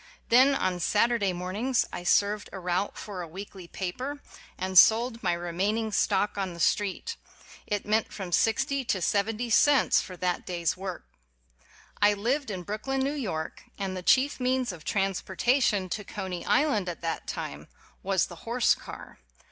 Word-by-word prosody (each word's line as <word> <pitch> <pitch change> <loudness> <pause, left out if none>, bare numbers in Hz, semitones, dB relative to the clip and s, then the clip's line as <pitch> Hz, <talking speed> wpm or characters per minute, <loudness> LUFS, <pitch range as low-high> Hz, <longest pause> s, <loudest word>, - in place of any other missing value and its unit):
Then 260 +4 +6
on 185 -7 0
Saturday 210 +2 +2
mornings 195 +9 -1
I - - -4
served 205 +3 +2
a 195 - -7
route 180 +2 -1
for 200 -4 -6
a 170 - -6
weekly 190 +1 -9
paper, 250 +12 -4 0.4
and 185 +1 -3
sold 230 +5 +6
my 180 -3 +1
remaining 195 +6 -1
stock 205 +2 +1
on 190 -3 -3
the - - -10
street. 205 - 0 0.5
It 205 -1 -2
meant 215 +1 +1
from 190 -4 -6
sixty 270 - +1
to 195 - 0
seventy 215 +6 0
cents 285 +4 +5
for 185 - -9
that 180 0 -1
day's 170 -2 -1
work. 185 -1 -6 1.0
I 205 0 +5
lived 250 +6 -1
in 185 -3 -4
Brooklyn, 240 +8 -2
New 275 +2 0
York, 190 - -4
and 195 -2 -3
the 185 - -4
chief 265 +10 +3
means 255 -2 +1
of 165 -4 -11
transportation 195 - +1
to 210 - -3
Coney 190 -4 -5
Island 215 -11 +2
at 170 - -7
that 165 -1 -3
time - - -5 0.3
was 190 -2 +1
the 175 - -11
horse 235 +5 +2
car. - - -10
200 Hz, 165 wpm, -28 LUFS, 180-235 Hz, 1.0 s, Then